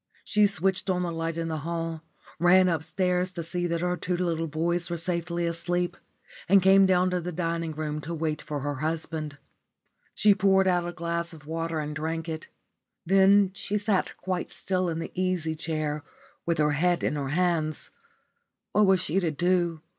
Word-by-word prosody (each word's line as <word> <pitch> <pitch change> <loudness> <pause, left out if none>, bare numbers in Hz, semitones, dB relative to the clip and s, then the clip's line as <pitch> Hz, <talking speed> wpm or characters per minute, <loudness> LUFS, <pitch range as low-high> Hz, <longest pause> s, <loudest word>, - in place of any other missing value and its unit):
She 210 -1 +4
switched 190 0 -1
on 180 -1 +1
the 175 - -2
light 165 0 -3
in 165 0 -2
the 160 -1 -2
hall, 165 +1 -3 0.4
ran 185 +2 +6
upstairs 180 +2 0
to 170 - -4
see 175 +2 -2
that 170 -1 -1
her 180 0 0
two 180 +1 -2
little 165 -2 -1
boys 170 +3 0
were 170 - -2
safely 170 0 -2
asleep, 175 +1 -1 0.5
and 195 +1 +7
came 195 0 +6
down 185 0 +3
to 180 -1 0
the 180 +1 -4
dining 165 -1 -2
room 150 0 -3
to 165 +3 -5
wait 155 -1 -2
for 145 -2 -4
her 145 +1 -2
husband. 155 -1 -3 0.8
She 210 -1 +5
poured 195 -1 +3
out 175 -1 +2
a - - -3
glass 170 0 -3
of 150 -3 -13
water 165 +1 -2
and 150 0 -4
drank 160 +2 -3
it. 160 -1 -5 0.6
Then 195 +1 +5
she 200 +1 -2
sat 205 -2 0
quite 185 -2 -3
still 185 -1 -1
in 160 - -2
the 165 - -5
easy 180 -3 -1
chair 155 -2 -3 0.4
with 170 - +1
her 150 0 +3
head 175 +4 +1
in - - +1
her 140 -2 -3
hands. 160 -2 0 0.8
What 210 -1 +4
was 190 -1 +4
she 185 +1 +1
to 175 -4 0
do? 175 0 +1
170 Hz, 185 wpm, -27 LUFS, 160-185 Hz, 0.8 s, and